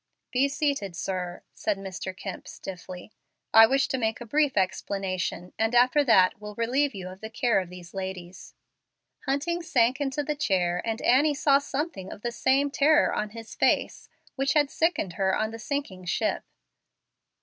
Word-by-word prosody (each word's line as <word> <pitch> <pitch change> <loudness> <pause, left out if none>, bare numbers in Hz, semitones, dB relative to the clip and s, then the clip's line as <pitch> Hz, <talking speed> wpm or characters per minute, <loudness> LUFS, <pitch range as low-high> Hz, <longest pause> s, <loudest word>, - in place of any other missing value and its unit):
"Be 260 +2 +3
seated, 275 - -1
sir," 180 -1 -4
said 210 -2 -1
Mr. 190 -1 -6
Kemp, 195 -1 -7
stiffly; 185 +1 -9 0.4
"I 225 0 +9
wish 270 +3 +2
to 265 - -1
make 220 -1 -1
a 240 - -7
brief 290 +2 +1
explanation, 185 -2 -2
and 225 +2 +1
after 255 +5 +5
that 200 -6 +4
will 210 0 -8
relieve 255 +4 0
you 185 -2 -6
of 185 +1 -10
the 220 - -6
care 235 -2 +1
of 185 -2 -5
these 180 -1 -11
ladies." 185 -2 -7 0.7
Hunting 300 +6 0
sank 255 -3 +2
into 285 +1 -1
a 300 - +1
chair, 180 -10 0
and 225 0 -3
Annie 290 +4 +4
saw 280 0 +4
something 285 - -4
of - - -10
the 240 - -1
same 275 +4 +2
terror 295 +2 +4
on 210 - -2
his 225 +1 -10
face - - 0 0.3
which 275 0 +1
had 290 -2 +2
sickened 320 - 0
her 190 0 +3
on 220 0 -1
the 225 - -8
sinking 220 -8 -4
ship. 175 - -1
225 Hz, 170 wpm, -27 LUFS, 190-275 Hz, 0.7 s, I